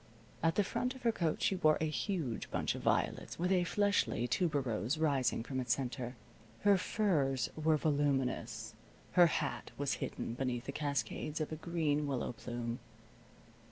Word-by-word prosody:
At 165 Hz, 0 st, +2 dB
the 205 Hz, -, +4 dB
front 250 Hz, +6 st, -2 dB
of 260 Hz, -, -12 dB
her 230 Hz, -, +4 dB
coat 170 Hz, -8 st, -1 dB
she 190 Hz, -, +2 dB
wore 155 Hz, -4 st, +4 dB
a -, -, 0 dB
huge 155 Hz, -, -2 dB
bunch -, -, 0 dB
of -, -, -6 dB
violets, -, -, 0 dB
with 180 Hz, +2 st, 0 dB
a 180 Hz, -2 st, +3 dB
fleshly 200 Hz, -, +1 dB
tuberose 130 Hz, -, 0 dB
rising 135 Hz, -7 st, +1 dB
from 130 Hz, +2 st, -3 dB
its 120 Hz, -2 st, +2 dB
center. 125 Hz, -1 st, -4 dB, 0.5 s
Her 205 Hz, -1 st, +6 dB
furs 155 Hz, -, +1 dB
were 155 Hz, 0 st, +3 dB
voluminous. 135 Hz, -7 st, 0 dB, 0.4 s
Her 175 Hz, -1 st, +7 dB
hat 150 Hz, -3 st, -2 dB
was 140 Hz, -1 st, 0 dB
hidden -, -, -3 dB
beneath 125 Hz, -1 st, -2 dB
the 140 Hz, -, -3 dB
cascades 145 Hz, +1 st, -2 dB
of 155 Hz, -, -2 dB
a -, -, -2 dB
green 155 Hz, -3 st, 0 dB
willow 130 Hz, -4 st, -1 dB
plume. 120 Hz, 0 st, -4 dB
145 Hz, 160 wpm, -34 LUFS, 125-170 Hz, 0.5 s, Her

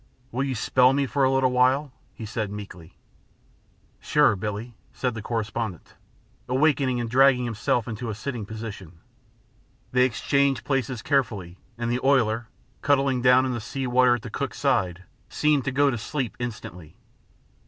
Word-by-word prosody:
"Will 125 Hz, +3 st, -1 dB
you 135 Hz, -2 st, -2 dB
spell 125 Hz, +3 st, +3 dB
me 140 Hz, 0 st, +1 dB
for 140 Hz, +1 st, 0 dB
a 130 Hz, -, +4 dB
little 135 Hz, -1 st, +2 dB
while?" 130 Hz, +3 st, +2 dB, 0.2 s
he 110 Hz, -, -7 dB
said, 110 Hz, -1 st, -3 dB
meekly. 95 Hz, -5 st, -10 dB, 1.0 s
"Sure, -, -, +3 dB
Billie," 105 Hz, +4 st, -5 dB, 0.2 s
said 125 Hz, -2 st, -2 dB
the 110 Hz, -, -6 dB
correspondent, 110 Hz, -4 st, -4 dB, 0.6 s
awakening 130 Hz, -2 st, +2 dB
and 120 Hz, -, -2 dB
dragging 125 Hz, +1 st, +4 dB
himself 115 Hz, 0 st, 0 dB
to 115 Hz, 0 st, -5 dB
a 110 Hz, -, -3 dB
sitting 120 Hz, 0 st, -5 dB
position. 100 Hz, -5 st, -8 dB, 0.9 s
They 125 Hz, 0 st, +4 dB
exchanged 140 Hz, +2 st, +1 dB
places 130 Hz, -4 st, -1 dB
carefully, 105 Hz, -, -1 dB, 0.2 s
and 120 Hz, 0 st, -2 dB
the 125 Hz, +1 st, -2 dB
oiler, 120 Hz, -4 st, +2 dB, 0.3 s
cuddling 135 Hz, -2 st, +2 dB
down 125 Hz, +1 st, +5 dB
in 130 Hz, -, -1 dB
the 120 Hz, -, -4 dB
sea 135 Hz, +5 st, -4 dB
water 125 Hz, 0 st, +4 dB
at 120 Hz, -, -7 dB
the -, -, -8 dB
cook's -, -, -4 dB
side, 90 Hz, -1 st, 0 dB, 0.3 s
seemed 150 Hz, -3 st, +1 dB
to 135 Hz, -, 0 dB
go 140 Hz, +2 st, +3 dB
to 120 Hz, -, -3 dB
sleep 130 Hz, +1 st, -3 dB
instantly. 95 Hz, -9 st, -7 dB
125 Hz, 160 wpm, -25 LUFS, 110-135 Hz, 1.0 s, down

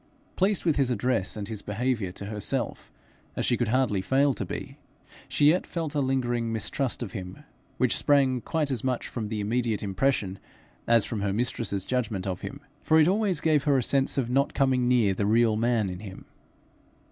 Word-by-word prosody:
Pleased 195 Hz, 0 st, +1 dB
with 160 Hz, -4 st, +2 dB
his 135 Hz, -3 st, +2 dB
address 115 Hz, -4 st, 0 dB
and 100 Hz, -1 st, -5 dB
his 110 Hz, -2 st, -5 dB
behaviour 110 Hz, -2 st, -2 dB
to 100 Hz, -, -7 dB
herself 105 Hz, -1 st, -3 dB, 0.4 s
as -, -, -1 dB
she 120 Hz, -, +3 dB
could 120 Hz, -1 st, -1 dB
hardly 115 Hz, -4 st, +1 dB
fail 135 Hz, +7 st, +2 dB
to 105 Hz, -, -4 dB
be, 90 Hz, -, -7 dB, 0.5 s
she 145 Hz, -, +4 dB
yet 175 Hz, +4 st, +1 dB
felt 165 Hz, -4 st, -4 dB
a 145 Hz, -, +1 dB
lingering 120 Hz, -3 st, 0 dB
mistrust 120 Hz, +4 st, -1 dB
of 105 Hz, -, -7 dB
him, 90 Hz, 0 st, -8 dB, 0.3 s
which -, -, +2 dB
sprang 135 Hz, -3 st, +3 dB
quite 155 Hz, 0 st, -1 dB
as 125 Hz, -5 st, -2 dB
much 130 Hz, -2 st, -1 dB
from 110 Hz, -4 st, -4 dB
the 105 Hz, 0 st, -3 dB
immediate 110 Hz, 0 st, -1 dB
impression 100 Hz, -1 st, 0 dB, 0.5 s
as 115 Hz, -3 st, +4 dB
from 110 Hz, -3 st, -4 dB
her 100 Hz, -1 st, 0 dB
mistress's 100 Hz, -3 st, -1 dB
judgment 115 Hz, -7 st, -2 dB
of 95 Hz, -2 st, -3 dB
him, 140 Hz, +1 st, -7 dB, 0.2 s
for 160 Hz, 0 st, +4 dB
it 155 Hz, -, +5 dB
always 195 Hz, -1 st, +1 dB
gave 155 Hz, -3 st, +2 dB
her 140 Hz, -2 st, +3 dB
a 130 Hz, -, +1 dB
sense 135 Hz, +3 st, +1 dB
of 130 Hz, -4 st, +1 dB
not 135 Hz, +3 st, +1 dB
coming 130 Hz, -3 st, +2 dB
near 120 Hz, -6 st, +3 dB
the 100 Hz, +2 st, -1 dB
real 115 Hz, 0 st, +3 dB
man 115 Hz, -1 st, +1 dB
in 90 Hz, -1 st, -6 dB
him. 95 Hz, -2 st, -10 dB
120 Hz, 195 wpm, -27 LUFS, 105-135 Hz, 0.5 s, it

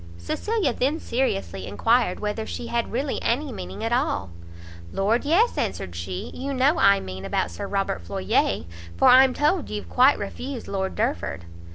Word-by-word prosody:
Cecilia 300 Hz, -, -1 dB
then 285 Hz, +7 st, 0 dB
seriously 95 Hz, -, -2 dB
enquired 225 Hz, -, +2 dB
whether 215 Hz, +1 st, -3 dB
she 240 Hz, -, -5 dB
had 235 Hz, 0 st, -2 dB
really 265 Hz, +4 st, -2 dB
any 275 Hz, +4 st, 0 dB
meaning 220 Hz, -, -7 dB
at 225 Hz, -, -1 dB
all. 100 Hz, -, 0 dB, 0.6 s
"Lord 220 Hz, +7 st, +1 dB
yes," 375 Hz, +11 st, +3 dB
answered 90 Hz, -2 st, -3 dB
she, 90 Hz, +2 st, -5 dB
"you 275 Hz, +1 st, -4 dB
know 275 Hz, +6 st, +3 dB
I 200 Hz, 0 st, +6 dB
mean 95 Hz, 0 st, -7 dB
about 95 Hz, -3 st, -1 dB
Sir 85 Hz, -, -5 dB
Robert 195 Hz, -, -1 dB
Floyer; 85 Hz, -1 st, 0 dB, 0.3 s
for -, -, +5 dB
I'm 260 Hz, 0 st, +7 dB
told 305 Hz, +3 st, +1 dB
you've 210 Hz, -1 st, -5 dB
quite 260 Hz, +3 st, +5 dB
refused 245 Hz, +5 st, -6 dB
Lord 190 Hz, -1 st, -2 dB
Derford." 215 Hz, -, -2 dB
230 Hz, 165 wpm, -24 LUFS, -, 0.6 s, I'm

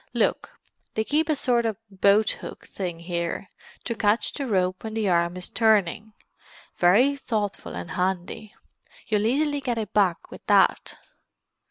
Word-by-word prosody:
Look—they 470 Hz, -, -3 dB
keep 300 Hz, +6 st, 0 dB
a 310 Hz, -, +3 dB
sort 245 Hz, -4 st, +2 dB
of 220 Hz, -3 st, -1 dB
boathook 200 Hz, +2 st, +1 dB
thing 175 Hz, -4 st, -5 dB
here, 170 Hz, +2 st, -3 dB, 0.3 s
to 235 Hz, -, -2 dB
catch 215 Hz, 0 st, +1 dB
the 280 Hz, -2 st, -4 dB
rope 185 Hz, -3 st, 0 dB
when 220 Hz, -1 st, -5 dB
the 220 Hz, -2 st, 0 dB
arm 170 Hz, 0 st, +1 dB
is 180 Hz, -, -4 dB
turning—very 215 Hz, +2 st, +1 dB
thoughtful 215 Hz, -, -3 dB
and 90 Hz, 0 st, -6 dB
handy. 190 Hz, +3 st, -3 dB, 0.5 s
You'll 210 Hz, 0 st, +1 dB
easily 290 Hz, +3 st, +1 dB
get 245 Hz, -3 st, -2 dB
it 220 Hz, -2 st, -4 dB
back 190 Hz, -5 st, +1 dB
with -, -, -11 dB
that." -, -, +3 dB
210 Hz, 140 wpm, -25 LUFS, 185-235 Hz, 0.5 s, a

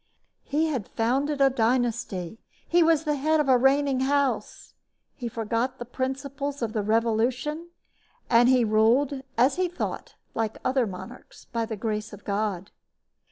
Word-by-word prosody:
He 300 Hz, +3 st, 0 dB
had 270 Hz, -10 st, -2 dB
founded 275 Hz, +5 st, 0 dB
a 270 Hz, -1 st, +5 dB
dynasty. 230 Hz, -5 st, -1 dB, 0.3 s
He 345 Hz, +1 st, +4 dB
was 325 Hz, -2 st, +4 dB
the 300 Hz, -2 st, 0 dB
head 310 Hz, +3 st, +2 dB
of 295 Hz, -, +1 dB
a 260 Hz, -, +6 dB
reigning 270 Hz, +1 st, +3 dB
house. 280 Hz, +1 st, -1 dB, 0.4 s
He 245 Hz, -, -6 dB
forgot 230 Hz, +3 st, -2 dB
the 240 Hz, -, -6 dB
principles 275 Hz, +2 st, -4 dB
of 220 Hz, -1 st, -2 dB
the 215 Hz, -, 0 dB
Revolution, 235 Hz, +9 st, 0 dB, 0.6 s
and 240 Hz, +1 st, +5 dB
he 255 Hz, -2 st, +4 dB
ruled, 235 Hz, +6 st, +2 dB, 0.2 s
as 265 Hz, +6 st, +3 dB
he 370 Hz, 0 st, +2 dB
thought, 355 Hz, -, -5 dB, 0.2 s
like 220 Hz, -1 st, -2 dB
other 255 Hz, -2 st, +2 dB
monarchs, 205 Hz, +6 st, -10 dB
by 230 Hz, -1 st, -3 dB
the 220 Hz, -, -5 dB
grace 215 Hz, 0 st, -3 dB
of 205 Hz, -, -12 dB
God. 200 Hz, -2 st, -2 dB
255 Hz, 155 wpm, -26 LUFS, 225-280 Hz, 0.6 s, a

